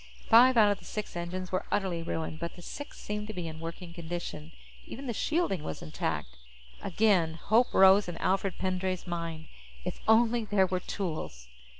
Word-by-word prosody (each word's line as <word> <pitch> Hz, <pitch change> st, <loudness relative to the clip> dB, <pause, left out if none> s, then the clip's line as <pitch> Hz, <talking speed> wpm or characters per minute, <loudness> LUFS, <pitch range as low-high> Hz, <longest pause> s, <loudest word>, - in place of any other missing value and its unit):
Five 250 Hz, +2 st, +7 dB
out 210 Hz, -2 st, +7 dB
of 205 Hz, -, -2 dB
the -, -, -16 dB
six 210 Hz, -3 st, -5 dB
engines 180 Hz, +2 st, -4 dB
were 185 Hz, -, -1 dB
utterly 190 Hz, -4 st, 0 dB
ruined, 160 Hz, -1 st, -4 dB
but 170 Hz, 0 st, -5 dB
the 175 Hz, -, -12 dB
sixth 290 Hz, +9 st, -8 dB
seemed 210 Hz, 0 st, -4 dB
to 215 Hz, -, -5 dB
be 175 Hz, -2 st, -3 dB
in 160 Hz, 0 st, -7 dB
working 170 Hz, +1 st, -7 dB
condition. 170 Hz, -2 st, -6 dB, 0.4 s
Even 275 Hz, +4 st, -7 dB
the 240 Hz, -, -2 dB
shielding 305 Hz, -, 0 dB
was 80 Hz, -, -6 dB
intact. 65 Hz, -4 st, -3 dB, 0.4 s
Again, 180 Hz, -5 st, +2 dB
hope 220 Hz, +8 st, +2 dB
rose 190 Hz, +1 st, +6 dB
in 175 Hz, -, -5 dB
Alfred 190 Hz, -1 st, 0 dB
Pendray's 185 Hz, -1 st, -2 dB
mind. 165 Hz, -2 st, -4 dB, 0.4 s
If -, -, -4 dB
only 230 Hz, +1 st, +4 dB
there 205 Hz, -3 st, +3 dB
were 185 Hz, 0 st, -1 dB
tools! 155 Hz, -, -5 dB
185 Hz, 180 wpm, -30 LUFS, 165-210 Hz, 0.4 s, Five